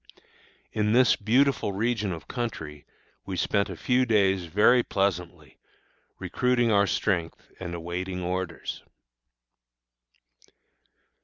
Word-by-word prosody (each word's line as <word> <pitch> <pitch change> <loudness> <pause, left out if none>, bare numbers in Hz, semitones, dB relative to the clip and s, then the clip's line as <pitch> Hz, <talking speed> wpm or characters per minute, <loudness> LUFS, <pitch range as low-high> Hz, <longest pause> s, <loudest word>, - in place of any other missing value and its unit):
In 105 0 0
this 125 0 +5
beautiful 120 0 +2
region 110 -1 -1
of 85 -2 -7
country 80 - -5 0.4
we 95 -2 -5
spent 100 +3 +1
a 95 - -7
few 125 +6 +2
days 100 -6 +2
very 105 +8 +4
pleasantly, 90 - -3 0.6
recruiting 125 -2 +1
our 100 -1 +4
strength 85 -3 -2
and 85 -2 -5
awaiting 90 +2 -4
orders. 90 -1 -4
100 Hz, 100 wpm, -26 LUFS, 90-115 Hz, 0.6 s, this